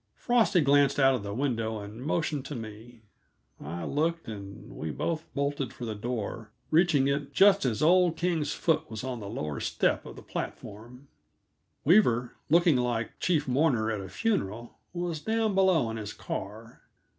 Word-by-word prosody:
Frosty 235 -7 +3
glanced 140 -1 +4
out 135 -1 +5
of 125 - -1
the 100 0 -5
window 115 -2 -1
and 105 +3 -9
motioned 150 -2 -1
to 145 - -6
me. 115 +1 -9 0.6
I 85 +4 -5
looked, 165 +2 -1
and 100 -3 -9
we 80 - -4
both 160 - -3
bolted 140 -3 -1
for 120 - -7
the 110 - -3
door, 110 0 -4 0.2
reaching 155 -4 +4
it 140 0 -2
just 195 -6 +6
as 120 +2 0
old 175 0 +4
King's 165 -4 0
foot 160 0 0
was 110 0 -6
on 130 -2 -4
the 100 -2 -7
lower 75 -7 -4
step - - 0
of - - -9
the - - -11
platform. 120 +6 -7 0.8
Weaver, 125 - +4 0.2
looking 170 -2 +5
like 120 -2 -2
chief 155 -5 +1
mourner 125 -5 +2
at 105 -3 -3
a 95 - -8
funeral, 115 - -2
was 175 -2 -3
down 220 +1 0
below 185 -11 +3
in 110 - -5
his 105 -1 -6
car. 110 +4 -7
135 Hz, 170 wpm, -28 LUFS, 110-160 Hz, 0.8 s, just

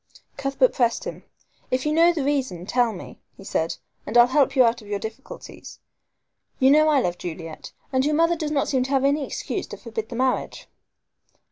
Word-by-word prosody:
Cuthbert 275 - +1
pressed 235 -3 +1
him. - - -7 0.4
"If 255 +2 -1
you 300 - +1
know 335 +2 +5
the 320 -5 -2
reason, 260 -11 -1
tell 245 +2 +2
me," 185 - -10 0.2
he - - -12
said, 165 -3 -2 0.3
"and 225 - -1
I'll 240 - +9
help 270 +1 +2
you 260 - +6
out 235 0 +1
of 210 - -14
your 205 0 -2
difficulties. 220 +6 -9 0.8
You 265 +1 +5
know 310 +1 +5
I 295 -2 +4
love 175 -7 -2
Juliet, 165 -2 -7 0.2
and 260 0 +2
your 300 +2 +1
mother 335 +2 +3
does 310 -2 -3
not 290 -2 0
seem 260 -2 +1
to - - -6
have 270 -1 +2
any 285 +1 +2
excuse - - -4
to - - -8
forbid 445 - -6
the 235 - -6
marriage." 255 +1 -1
265 Hz, 205 wpm, -24 LUFS, 230-295 Hz, 0.8 s, I'll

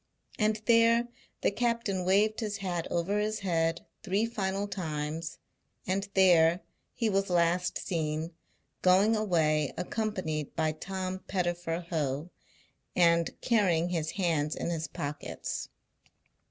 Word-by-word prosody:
And 215 0 +2
there 230 0 +4 0.3
the - - +2
captain 230 -4 0
waved 205 +4 +3
his 210 -3 -2
hat 180 -4 -3
over 185 +5 0
his 215 0 -1
head 165 -3 0 0.2
three 205 +1 +1
final 200 -3 -2
times; 160 -3 -4 0.5
and 195 +2 -1
there 175 -2 +5 0.3
he 230 - 0
was 195 -2 +1
last 175 +1 +2
seen, 160 -2 -2 0.5
going 195 +5 +5
away 160 -8 +2
accompanied 180 -6 -2
by 160 -1 +1
Tom 185 +3 -4
Pettifer 175 -2 -2
Ho, 150 +1 -1 0.6
and 170 -1 +3
carrying 180 -8 +2
his 165 -3 -1
hands 160 -6 0
in - - -2
his 165 -1 -2
pockets. 145 +1 -5
180 Hz, 120 wpm, -30 LUFS, 165-205 Hz, 0.6 s, there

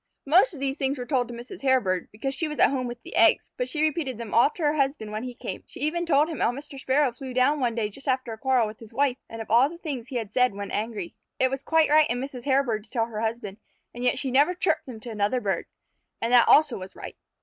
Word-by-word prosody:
Most 355 - +4
of - - -9
these 275 +1 -2
things 275 +1 0
were 250 - -5
told 250 -3 0
to 240 - -8
Mrs. 245 +10 -10
Hairbird, 245 -10 +1
because 270 +6 -3
she 320 +4 -1
was 300 -1 -6
at - - +5
home 255 -2 -1
with 240 0 -8
the - - -9
eggs, 225 - +4
but 250 0 -2
she 305 +3 0
repeated 300 -5 -1
them 230 -3 -7
all 235 - +5
to 330 - -7
her 295 0 +3
husband 275 -7 -1
when 215 +1 -3
he 250 0 -6
came. - - -6
She - - -10
even 345 +3 0
told 295 -1 +4
him 320 -6 -5
how - - +2
Mr. 275 +1 -9
Sparrow 265 +1 +2
flew 255 +1 -8
down 275 +4 +3
one 240 -3 0
day 225 -3 0
just 270 +8 -11
after 255 -3 0
a - - -8
quarrel 260 -3 +2
with 215 0 -8
his 225 -2 -13
wife, 260 +1 +1
and 225 0 -6
of 215 - -12
all 245 +5 +5
the 340 - -10
things 280 -8 -5
he 260 - -8
had 220 -3 -3
said 250 -4 +3
when 200 0 -6
angry. 210 -4 -3 0.2
It 260 0 +2
was 270 0 -3
quite 320 +1 +2
right 310 0 +5
in 245 +1 -1
Mrs. 260 -2 -7
Hairbird 265 -6 +1
to - - -18
tell 230 -3 0
her 220 -2 -6
husband, 220 -3 -3 0.4
and 240 - -6
yet 250 - +2
she 265 - -2
never 290 +8 +3
chirped 365 - 0
them 240 -4 -8
to 235 - -7
another 210 +4 0
bird. 195 -6 -2 0.5
And 230 +2 -1
that 240 -1 +7
also 295 -7 +5
was 185 +1 -9
right. - - -9
255 Hz, 280 wpm, -26 LUFS, 230-280 Hz, 0.5 s, that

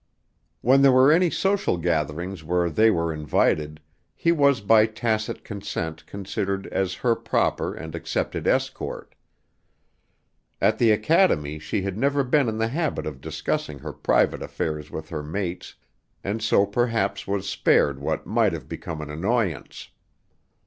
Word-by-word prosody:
When 130 +3 +5
there 140 -1 +7
were 130 +3 +6
any 175 +2 +4
social 195 - 0
gatherings 85 +1 -2
where 85 +1 0
they 110 +9 +4
were 85 -5 0
invited, 75 0 0 0.4
he 170 - +2
was 140 -6 +3
by 110 +2 +5
tacit 110 -1 -2
consent 95 -6 -5
considered 100 0 -3
as 95 -1 -2
her 120 -2 +4
proper - - -1
and 80 -1 -8
accepted 85 - -3
escort. - - -2 1.5
At - - +2
the 115 - +4
academy 105 - +2
she 75 +5 -3
had 100 +1 -4
never 140 +2 +2
been 130 -1 +2
in 110 - -3
the 115 0 0
habit 160 +3 -2
of 70 -4 -6
discussing 75 +1 -3
her - - -7
private - - +1
affairs 75 -1 -4
with 80 0 -7
her 75 - -4
mates, 85 +4 -5 0.5
and 105 +3 -3
so 105 -2 +3
perhaps 115 -1 -1
was 100 0 -2
spared 70 -7 +2
what 70 - -2
might - - +2
have - - -6
become 80 -2 -6
an 75 -1 -7
annoyance. 95 - -2
100 Hz, 150 wpm, -24 LUFS, 80-120 Hz, 1.5 s, there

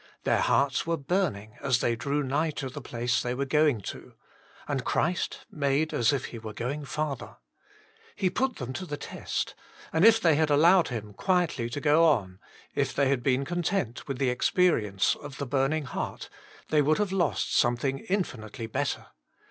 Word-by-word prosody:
Their - - +2
hearts 140 +3 +2
were 165 0 +1
burning 135 - -2
as 135 -3 +2
they 120 - +1
drew 140 +5 -1
nigh 145 +5 0
to 135 - -3
the 145 +3 -8
place 120 0 -1
they 125 0 -2
were 140 +2 -1
going 150 -4 +2
to, - - -8 0.5
and 140 -3 -1
Christ 175 +6 -1
made 145 +1 0
as 115 - +3
if 140 -3 -1
He 115 - -7
were 110 -1 -7
going 140 +6 -3
farther. 150 0 -4 0.8
He 185 -3 0
put 260 +6 0
them 130 -1 -5
to 185 +7 -5
the 145 - -4
test, - - -4 0.4
and 160 - +3
if 225 +1 +7
they 170 -6 +4
had 155 +1 +2
allowed 165 +5 +5
Him 105 -4 -5
quietly 175 - 0
to 130 - -4
go 150 +3 +4
on, 100 - +1 0.3
if - - -1
they 140 -1 +3
had 135 -3 +1
been 130 +1 +1
content 175 - -2
with 135 -2 -3
the 130 -2 +1
experience 115 - +2
of 145 -1 -9
the 140 - -3
burn 135 +1 +1
ing 155 -2 -1
heart, - - -5 0.4
they 155 -1 +4
would 155 +2 +3
have 205 -3 0
lost 190 -3 0
some 120 0 +3
thing 135 +2 -1
infinitely 125 - -3
better. 130 +5 -2
140 Hz, 190 wpm, -28 LUFS, 125-160 Hz, 0.8 s, if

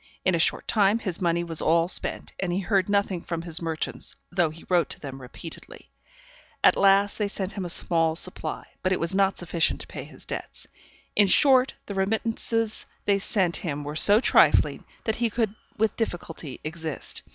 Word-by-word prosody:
In 185 - +3
a 170 - +1
short - - +1
time 205 -1 +3
his 190 -7 +1
money 170 -1 +1
was 165 -2 0
all 165 +1 +3
spent, - - -2
and 185 -2 -1
he 175 - 0
heard 195 0 +1
nothing 200 -3 +1
from 165 -1 -4
his 170 0 +1
merchants 165 -1 -4 0.2
though 175 -3 +2
he 160 +2 -12
wrote 175 -2 +2
to - - -4
them 135 -2 -8
repeatedly; 135 +6 -11 0.7
at - - +6
last 200 +1 +3
they 210 - +1
sent 200 -1 -4
him 195 -3 -5
a - - -5
small 165 -2 +2
supply, 185 +2 -2 0.2
but 185 - 0
it 185 - +1
was 170 +2 +1
not 195 0 +2
sufficient 170 -1 0
to - - -6
pay - - -8
his - - -10
debts. - - -7 0.5
In 205 - +5
short, 260 +4 +4
the 200 - -6
remittances 225 +2 0 0.2
they 200 -1 +2
sent 190 -4 0
him 150 -4 -4
were 145 +1 -6
so 205 +7 +5
trifling, - - +3 0.2
that 220 - -1
he 235 -1 +1
could 220 -2 -1 0.2
with 220 -1 +1
difficulty 165 - -4
exist. 160 -1 -5
185 Hz, 190 wpm, -25 LUFS, 165-205 Hz, 0.7 s, at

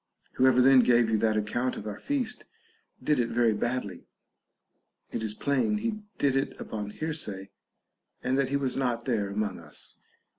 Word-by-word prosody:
Whoever 125 -1 +5
then 135 0 +7
gave 120 -2 +4
you 110 - +3
that 110 -1 +2
account 120 +4 -1
of - - -7
our 105 -1 -5
feast 275 -5 -2 0.6
did 150 -3 +2
it 120 - +1
very 120 -2 +3
badly; 105 -4 -3 1.0
it - - -3
is 110 -1 -2
plain 140 - +1
he 215 0 -2 0.2
did 140 -2 +2
it 135 +1 -1
upon 105 -2 -5
hearsay, 105 -9 -4 0.7
and 130 - +1
that 135 -1 +1
he 140 - +1
was 135 -2 -1
not 120 -3 -1
there 110 -6 0
among 100 -1 -2
us. 75 -3 -8
120 Hz, 170 wpm, -28 LUFS, 105-135 Hz, 1.0 s, then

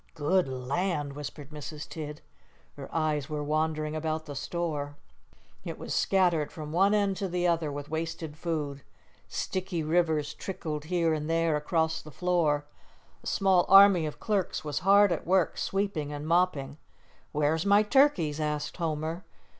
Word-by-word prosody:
"Good 165 +3 +2
land!" 140 +3 -2
whispered 145 0 -8
Mrs. 150 0 -7
Tidd. 150 -2 -7 0.5
Her - - -9
eyes 155 -3 -1
were 150 -1 -3
wandering 155 0 -1
about 155 0 -2
the 145 - -7
store. 145 -1 -3 0.7
It - - -6
was - - -5
scattered 175 -6 +2
from 150 -2 -7
one 195 +5 +3
end 200 -2 +1
to 195 - -2
the 180 0 -1
other 165 -3 +1
with 145 0 -6
wasted 160 -1 -4
food. 150 -4 -3 0.5
Sticky 185 -3 -3
rivers 155 -2 +1
trickled 155 -6 -5
here 170 -1 +1
and 155 0 -3
there 165 -1 +2
across 160 +1 0
the 155 - -12
floor. 155 -3 +1 0.6
A - - -8
small 190 -3 +3
army 195 -4 +8
of 150 - -7
clerks 200 -4 -1
was 150 -1 -2
hard 200 +2 +5
at 165 - -2
work 185 -1 +2
sweeping 195 -7 -1
and 145 +1 -5
mopping. 155 -5 +1 0.5
"Where's 150 +2 +1
my 200 +1 +5
turkeys?" 210 - +3
asked 150 -1 -2
Homer. 160 +1 -2
160 Hz, 155 wpm, -28 LUFS, 150-180 Hz, 0.7 s, army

